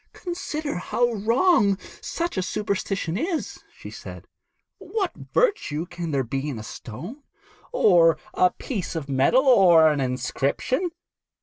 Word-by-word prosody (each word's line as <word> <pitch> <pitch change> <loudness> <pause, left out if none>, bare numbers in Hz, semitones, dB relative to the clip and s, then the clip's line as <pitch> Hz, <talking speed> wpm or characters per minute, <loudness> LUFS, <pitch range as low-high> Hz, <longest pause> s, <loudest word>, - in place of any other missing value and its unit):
'Consider 310 - -4
how 240 +6 0
wrong 220 - +3 0.2
such 340 +1 -3
a 190 - 0
superstition 195 -3 -2
is,' 330 +1 -3
she - - -11
said. - - -10 0.5
'What 400 -5 -2
virtue 405 - 0
can 175 -2 -6
there 140 -3 0
be 135 +5 -3
in 135 - -4
a 110 - -7
stone, 170 - -9 0.5
or 175 - +5 0.2
a 180 - +4
piece 190 -2 -5
of 155 -4 -4
metal, 140 - +3
or 175 -11 +7
an 145 -2 -1
inscription? 135 - -1
190 Hz, 130 wpm, -24 LUFS, -, 0.5 s, or